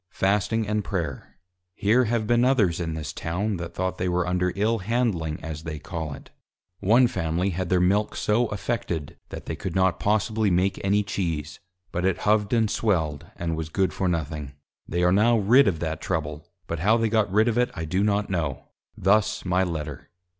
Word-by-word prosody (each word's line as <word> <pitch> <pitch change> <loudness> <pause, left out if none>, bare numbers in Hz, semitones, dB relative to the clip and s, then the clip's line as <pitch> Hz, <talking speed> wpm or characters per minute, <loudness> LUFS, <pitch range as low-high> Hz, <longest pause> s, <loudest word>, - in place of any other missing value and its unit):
_ - - -57
Fasting 105 +3 0
and 105 0 0
Prayer. 80 - -4 0.4
Here 115 +5 +3
have 115 -1 0
been 120 +2 +3
others 110 -10 +3
in 80 -2 -3
this 80 -2 -5
Town, 95 +5 -2
that 85 -1 -7
though 95 0 0
they 90 0 -2
were 90 0 +1
under 90 0 0
Ill 110 +3 +1
handling 100 -8 -1
as 80 -1 -5
they 80 -2 -5
call 80 -2 -5
it: - - -15 0.5
One 115 +6 +5
Family 90 -3 -1
had 90 0 -3
their 90 - +3
Milk 100 +4 +2
so 115 +3 +1
affected, 100 - -3
that - - -8
they - - -4
could 90 - -5
not 95 -2 +2
possibly 110 +1 +1
make 95 +2 +1
any 100 +1 +2
Cheese, 80 -6 -3 0.3
but 85 - -2
it 95 -1 +1
hov'd 105 -1 +2
and 115 -2 +3
swelled, 80 -10 -1
and 85 -1 -2
was 80 -1 -4
good 95 +3 0
for 95 - -1
nothing: 75 -4 -3 0.3
They 85 +2 -1
are 90 - +4
now 115 +4 +4
rid 115 +5 +5
of 90 -5 +1
that 80 -1 -3
trouble, 75 0 -3 0.2
but 85 - -4
how 105 +7 +4
they 115 -1 +1
got 110 -3 +1
rid 110 +3 +4
of 120 0 +1
it 125 - +2
I 80 - -4
do 95 +5 0
not 105 0 +1
know': 80 -8 -3 0.3
Thus 105 +3 +2
my 90 +1 +2
Letter. 75 -5 -5
95 Hz, 200 wpm, -25 LUFS, 85-105 Hz, 0.5 s, One